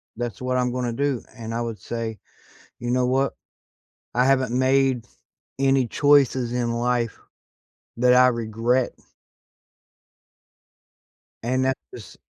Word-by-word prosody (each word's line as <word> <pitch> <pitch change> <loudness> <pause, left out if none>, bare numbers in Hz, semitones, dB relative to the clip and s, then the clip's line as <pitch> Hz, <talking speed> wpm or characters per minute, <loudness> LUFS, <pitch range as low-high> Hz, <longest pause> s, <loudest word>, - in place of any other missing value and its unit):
that's 120 -2 -5
what 125 0 -1
I'm 125 -1 +1
gonna 125 -1 -2
do," 140 0 -1
and 115 -1 -6
I 115 - -1
would 115 -2 -4
say, 115 -2 -4 0.6
"You 120 0 -3
know 125 0 +2
what? 135 +2 +1 0.8
I 125 +1 +3
haven't 130 -2 +2
made 130 -2 +2 0.5
any 135 -1 +3
choices 130 -3 +3
in 120 -1 0
life 120 -1 -1 0.8
that 125 +1 +4
I 125 0 +7
regret." 120 +1 0 2.5
And 130 +2 +1
that 130 0 +2 0.2
is. - - -11
125 Hz, 120 wpm, -24 LUFS, 120-130 Hz, 2.5 s, I